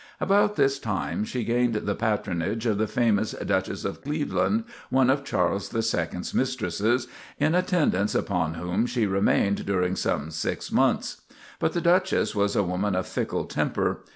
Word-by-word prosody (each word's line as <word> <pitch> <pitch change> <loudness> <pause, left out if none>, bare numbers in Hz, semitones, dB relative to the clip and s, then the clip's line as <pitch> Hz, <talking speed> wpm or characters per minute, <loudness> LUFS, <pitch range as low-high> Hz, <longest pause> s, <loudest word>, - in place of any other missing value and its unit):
About 205 +2 +3
this 135 -5 +2
time 105 -3 -2
she 120 +2 -3
gained 120 0 +1
the 105 -1 -1
patronage 105 0 -1
of 105 -3 +1
the 110 - +1
famous 110 -2 +1
Duchess - - -2
of - - -4
Cleveland, 155 +9 0 0.3
one 130 0 +4
of 140 +1 0
Charles 95 -4 0
the 115 - -1
Second's 90 -4 -2
mistresses, 120 -1 0 0.3
in 155 +3 +2
attendance 175 - +1
upon 85 -5 0
whom 90 +7 -1
she 120 -3 0
remained 100 0 +2
during 90 -1 +1
some 75 -3 -1
six 80 - -3
months. - - +1 0.4
But - - 0
the 175 - 0
Duchess 185 +3 +2
was 100 -1 +1
a 105 - +3
woman 95 +2 -1
of 95 - 0
fickle - - -2
temper. - - -1
110 Hz, 160 wpm, -26 LUFS, 95-130 Hz, 0.4 s, one